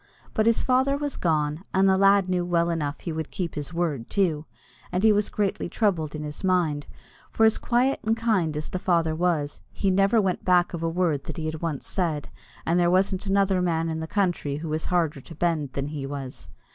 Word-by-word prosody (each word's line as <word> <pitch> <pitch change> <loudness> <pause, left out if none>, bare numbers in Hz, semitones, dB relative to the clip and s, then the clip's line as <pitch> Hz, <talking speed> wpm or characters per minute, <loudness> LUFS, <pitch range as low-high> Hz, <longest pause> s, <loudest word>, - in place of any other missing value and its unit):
But 215 +1 +2
his 230 - +3
father 265 +2 +2
was 290 -1 -3
gone, 155 -1 0
and 190 +1 +4
the 190 - +5
lad 195 0 +4
knew 180 -1 0
well 170 -1 +1
enough 150 -3 -2
that - - -18
he 170 - -3
would 160 -1 -4
keep 180 -5 -4
his 145 -1 -5
word 160 -8 -2
too; 165 -6 0 0.5
and 180 +2 -1
he 220 -1 +6
was 205 0 +1
greatly 200 -4 -1
troubled 170 -9 0
in 150 - -5
his 150 +4 -7
mind, 170 -6 +1 0.4
for 225 - +3
as 220 - +3
quiet 250 +3 +1
and 225 +1 +1
as 225 - -11
kind 180 -10 +1
as 155 - -3
the 185 - -3
father 170 -3 +1
was, 155 -3 -1
he 195 - 0
never 195 +4 +3
went 190 -3 0
back 180 -1 +3
of 170 - -4
a 165 - 0
word 165 -5 0
that - - -6
he 160 - -3
had 155 0 -4
once 160 -5 -3
said, 165 -6 -2 0.4
and 170 +2 +2
there 175 -1 +3
wasn't 190 +2 +1
another 195 -1 +2
man 165 -2 0
in 160 0 -3
the 160 - -4
country 175 -7 0
who 155 +2 -5
was 155 +1 -2
harder 165 -6 0
to 165 - -12
bend 155 -5 -1
than 140 +1 -3
he 145 -3 -5
was. 135 -2 -7
175 Hz, 230 wpm, -25 LUFS, 155-195 Hz, 0.5 s, he